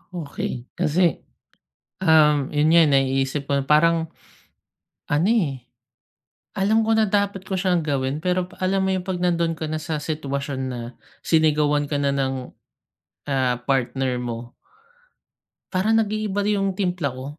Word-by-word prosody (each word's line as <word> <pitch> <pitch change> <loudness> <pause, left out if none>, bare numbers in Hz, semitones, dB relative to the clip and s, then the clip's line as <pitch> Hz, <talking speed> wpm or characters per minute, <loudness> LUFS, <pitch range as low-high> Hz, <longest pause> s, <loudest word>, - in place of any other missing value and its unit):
Okey 140 -6 -5
kasi, 170 -1 +1 0.8
um, 150 -4 +4
yun 150 +1 +2
nga 170 0 +7 0.2
naiisip 135 +1 0
ko 140 0 +1
parang, 160 +2 +3 1.0
ano, 160 +9 +2
eh. 145 - 0 1.0
Alam 215 +4 +3
ko 225 0 +1
na 220 - +4
dapat 200 -1 -1
ko 190 - -3
siyang 185 -1 +1
gawin. 140 0 -1
Pero, 180 +1 -1
alam 190 +1 +1
mo 190 - +1
yung, 185 0 -3
'pag 180 -2 -3
nandun 170 -2 +1
kana 155 0 -4
sa 155 -1 -4
sitwasyon 140 -3 -3
na 125 -1 -5 0.4
sinigawan 150 -2 +2
ka 145 - -4
na 140 -1 +1
ng, 135 -1 0 1.0
ah, 130 -3 +1
partner 130 -1 0
mo. 120 0 -6 1.2
Parang, 205 +4 +2
nag-iiba 210 -1 -1
yung 195 -2 +1
timpla 180 -8 -1
ko. 130 +1 -8
155 Hz, 135 wpm, -23 LUFS, 140-185 Hz, 1.2 s, nga